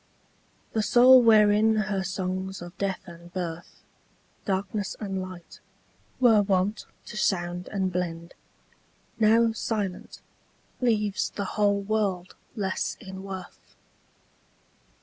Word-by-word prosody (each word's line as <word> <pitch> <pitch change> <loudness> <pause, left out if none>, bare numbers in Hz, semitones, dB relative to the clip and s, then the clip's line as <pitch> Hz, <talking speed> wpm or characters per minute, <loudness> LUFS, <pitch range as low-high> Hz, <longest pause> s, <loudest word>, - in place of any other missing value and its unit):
The 220 - +1
soul 250 +4 +7
wherein 215 -1 +5
her 210 -2 0
songs 190 0 -3
of 175 0 -10
death 195 -2 -2
and 170 -1 -13
birth, 175 -2 -6 0.6
Darkness 200 +1 -2
and 195 -3 -3
light, 185 -2 -10 0.6
were 230 -5 +6
wont 195 +1 0 0.2
to - - -9
sound 180 -3 -1
and 190 -3 -2
blend, 170 -1 -4 0.9
Now 225 +1 +4
silent, 210 -4 -4 0.6
leaves 210 -5 +1
the 200 - -4
whole 205 -1 +2
world 195 -3 -1 0.2
less 195 -4 -2
in 190 -3 -9
worth. 190 -2 -9
195 Hz, 110 wpm, -26 LUFS, 185-215 Hz, 0.9 s, soul